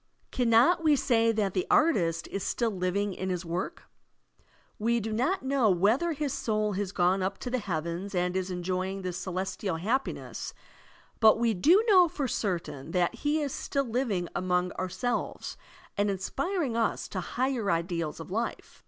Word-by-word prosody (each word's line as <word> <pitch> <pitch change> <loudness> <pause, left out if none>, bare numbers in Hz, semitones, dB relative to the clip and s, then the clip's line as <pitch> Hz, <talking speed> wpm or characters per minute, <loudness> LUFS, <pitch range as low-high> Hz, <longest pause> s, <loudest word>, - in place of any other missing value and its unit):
Caimot 245 +8 +4
we 305 -2 +5
say 230 -4 +3
that 210 -4 0
the 185 - -1
artist 190 - +3
is 195 - -3
still 230 +4 0
living 190 +1 -1
in 185 +1 -4
his 180 -1 -2
work? 170 +3 -4 1.0
We 235 +2 +2
do 220 0 -3
not 260 - 0
know 265 -4 +2
whether 220 - +2
his 290 -2 -2
soul 215 -2 0
has 195 0 -2
gone 185 0 +2
up 190 +1 -1
to 245 - -5
the 255 - +1
heavens 175 0 -3
and 180 0 0
is 190 0 -1
enjoying 185 +2 -2
the 180 -1 -3
celestial 185 +1 -3
happiness, 225 +11 -3 0.6
but 220 -2 +6
we 230 -1 +2
do 340 - +4
know 370 -5 +7
for 290 -4 -3
certain 165 - -3
that 180 -1 +2
he 300 +1 0
is 280 - -3
still 275 0 -1
living 225 -7 -1
among 180 0 0
oxu 185 -1 -4
selves 240 +6 -3 0.4
and 205 0 +1
inspiring 270 - -2
us 230 -1 0
to 190 - -3
higher 245 +2 -1
ideals 170 -2 -1
of 165 - -9
life. 230 +4 -4
205 Hz, 170 wpm, -29 LUFS, 180-245 Hz, 1.0 s, know